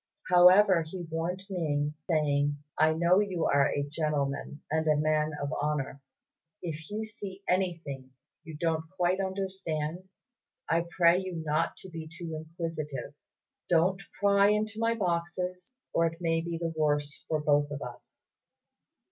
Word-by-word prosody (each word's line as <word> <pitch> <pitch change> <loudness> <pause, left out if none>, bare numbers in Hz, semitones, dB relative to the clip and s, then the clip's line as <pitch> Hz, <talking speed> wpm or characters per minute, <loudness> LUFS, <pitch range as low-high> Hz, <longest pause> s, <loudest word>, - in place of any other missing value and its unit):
However, 180 +1 +7
he 175 +3 -6
warned 165 +3 -3
Ning, 150 -6 -1 0.2
saying, 145 -2 +2 0.2
"I 155 0 +4
know 175 +3 +4
you 190 -5 0
are 140 -1 +4
a 145 - -1
gentleman 145 -1 -2
and 160 0 +1
a 155 - +5
man 155 +1 +1
of 145 +1 -3
honour. 145 -2 -2 0.6
If 160 -2 -5
you 215 +1 -3
see 200 -3 -8
anything 165 -8 -1 0.3
you 160 -2 -8
don't 160 -1 -1
quite 180 +1 +2
understand, 190 -3 -3 0.6
I 170 +1 +1
pray 170 0 +4
you 185 -2 -5
not 155 +2 0
to 190 - -10
be 165 -1 -6
too 170 -1 -6
inquisitive; 155 -4 -5 0.6
don't 180 +3 +3 0.2
pry 200 0 +5
into 215 +1 +1
my 230 0 +2
boxes, 180 -1 -2 0.2
or 165 - +3
it 165 0 -6
may 165 -2 +1
be 170 0 -3
the 165 -1 -2
worse 150 -1 0
for 155 - 0
both 145 -1 +2
of 145 -1 -5
us." 125 - -11
165 Hz, 150 wpm, -29 LUFS, 150-185 Hz, 0.6 s, However